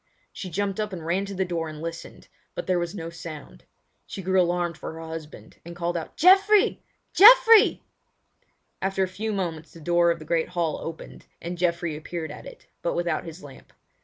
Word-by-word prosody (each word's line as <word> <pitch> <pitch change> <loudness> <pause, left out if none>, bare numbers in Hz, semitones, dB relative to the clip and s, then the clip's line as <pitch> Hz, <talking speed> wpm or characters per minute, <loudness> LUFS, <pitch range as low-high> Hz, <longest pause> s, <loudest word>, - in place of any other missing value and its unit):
She 185 - -7
jumped 195 +3 -2
up 210 -2 -2
and 170 -3 -7
ran 185 +4 0
to 200 0 -7
the 190 0 0
door 165 -3 -3
and 155 -1 -9
listened, 165 +1 -8 0.3
but - - -4
there 180 -1 +1
was 175 +2 -4
no 165 -3 -6
sound. 155 - -10 0.4
She 195 - -7
grew 190 +1 +3
alarmed 175 -1 0
for - - -7
her 160 - -9
husband, 160 -1 -9
and 170 +1 -10
called 175 0 -2
out: 165 - -5
"Geoffrey! 390 +4 +5 0.3
Geoffrey!" 455 0 +7 1.0
After 195 0 0
a - - 0
few 210 +4 -4
moments 170 -5 -4
the 165 - -12
door 170 +2 +2
of 170 - +1
the 155 - -11
great 165 0 0
hall 170 -3 -2
opened, 165 0 -9
and 175 +1 -5
Geoffrey 170 -2 -1
appeared 160 0 -6
at - - -10
it, - - -13 0.2
but 170 - -2
without 170 -3 -1
his 165 +2 -10
lamp. 140 -2 -14
175 Hz, 195 wpm, -25 LUFS, 165-190 Hz, 1.0 s, Geoffrey